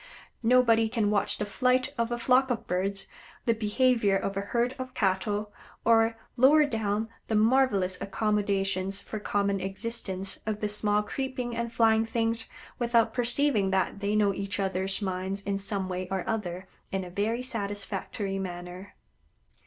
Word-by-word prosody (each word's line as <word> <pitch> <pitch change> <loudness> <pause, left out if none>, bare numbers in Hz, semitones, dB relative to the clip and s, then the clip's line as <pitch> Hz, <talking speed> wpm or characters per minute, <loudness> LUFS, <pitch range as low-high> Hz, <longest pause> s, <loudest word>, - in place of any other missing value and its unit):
Nobody 230 -2 +4
can 220 -3 +1
watch 205 - +1
the 210 - -2
flight 255 +6 +1
of 235 0 -1
a 240 - 0
flock 255 +2 +3
of 230 -2 -2
birds, 195 +1 -1 0.4
the 230 - +4
behavior 225 -1 +2
of 195 0 -3
a 195 - -1
herd 235 +5 0
of 255 0 -6
cattle, 205 +2 0 0.3
or, 225 0 +4 0.2
lower 295 +5 +6
down, 220 -4 -1 0.2
the 220 - 0
marvelous 215 -5 +3
accommodations 195 -1 0
for 215 +1 -6
common 200 -1 0
existence 195 0 -2
of 215 -1 -1
the 210 - -1
small 210 0 +1
creeping 255 0 -4
and 235 0 -2
flying 225 -1 +4
things, 225 0 -1 0.3
without 235 -1 +2
perceiving 245 -4 +2
that 190 +1 0
they 205 +1 0
know 205 -2 +3
each 200 0 -3
other's 190 +1 0
minds 190 +1 -3
in 200 0 -1
some 195 -1 -2
way 185 0 -3
or 190 0 -2
other 190 -5 -3 0.3
in 195 -1 -1
a 180 - -9
very 220 +6 -1
satisfactory 200 -3 -3
manner. 180 +1 -7
210 Hz, 155 wpm, -28 LUFS, 195-230 Hz, 0.4 s, lower